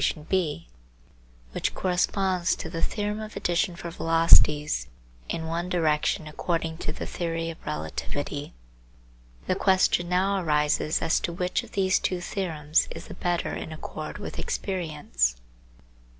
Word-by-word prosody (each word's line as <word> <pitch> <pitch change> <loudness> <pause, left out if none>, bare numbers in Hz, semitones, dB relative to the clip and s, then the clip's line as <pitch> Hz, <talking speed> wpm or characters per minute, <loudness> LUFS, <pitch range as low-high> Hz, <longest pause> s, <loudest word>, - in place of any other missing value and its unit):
gif 175 - +1 0.9
which - - -1
corresponds 185 0 +1
to 160 - -6
the 165 -2 -3
theorem 210 0 -1
of 215 0 -7
addition 175 +1 +1
for 170 0 -6
velocities 150 - +4 0.4
in 160 - -2
one 170 +2 -2
direction 155 -3 +1
according 165 +1 -2
to 155 - -3
the - - -5
theory 165 -1 -2
of 160 - -14
relativity. 145 - -3 0.9
The - - +2
question 185 -2 +3
now 190 +2 +2
arises 150 0 +2
as 165 +1 +3
to 170 - -2
which 180 +1 0
of - - -14
these 190 -1 +3
two 185 - -1
theorems 160 -5 0
is - - -7
the - - -6
better 175 -1 -1
in - - -5
accord 155 - -6
with - - -6
experience. 150 - -1
165 Hz, 135 wpm, -27 LUFS, 155-180 Hz, 0.9 s, velocities